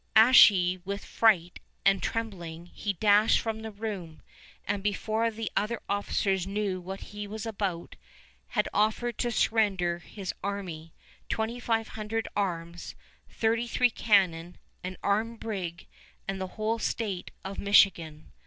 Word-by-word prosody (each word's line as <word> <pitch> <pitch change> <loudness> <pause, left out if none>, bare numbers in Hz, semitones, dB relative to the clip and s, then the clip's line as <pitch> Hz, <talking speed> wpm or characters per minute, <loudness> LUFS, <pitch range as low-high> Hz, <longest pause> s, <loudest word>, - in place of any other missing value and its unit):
Ashy 200 -6 +7
with 200 +2 -5
fright 185 -7 +2 0.3
and 195 0 +4
trembling, 175 -7 -4
he 205 - -2
dashed 205 +3 +4
from 220 -1 -3
the 220 - -5
room, 200 -7 -6 0.4
and, 200 0 -1
before 215 +3 0
the 225 -1 -5
other 215 +3 0
officers 195 -2 0
knew 195 -2 -2
what 190 +2 -7
he 205 0 -7
was 215 +2 -6
about, 195 -6 -3 0.5
had - - 0
offered 220 +2 +1
to 240 - +1
surrender 195 -7 +1
his 190 +2 -6
army, 180 -5 -5 0.4
twenty 225 +2 -2
five 225 -2 0
hundred 220 +1 -3
arms, 170 -3 -3 0.3
thirty 230 +1 0
three 245 +1 +3
cannon, 180 -6 +2 0.3
an 185 0 -5
armed 220 +3 0
brig, 185 -6 -5 0.4
and 195 -1 -3
the 190 - -2
whole 220 +1 0
state 205 -7 -2 0.2
of 195 +1 -5
Michigan. 170 -6 +3
200 Hz, 135 wpm, -28 LUFS, 185-220 Hz, 0.5 s, Ashy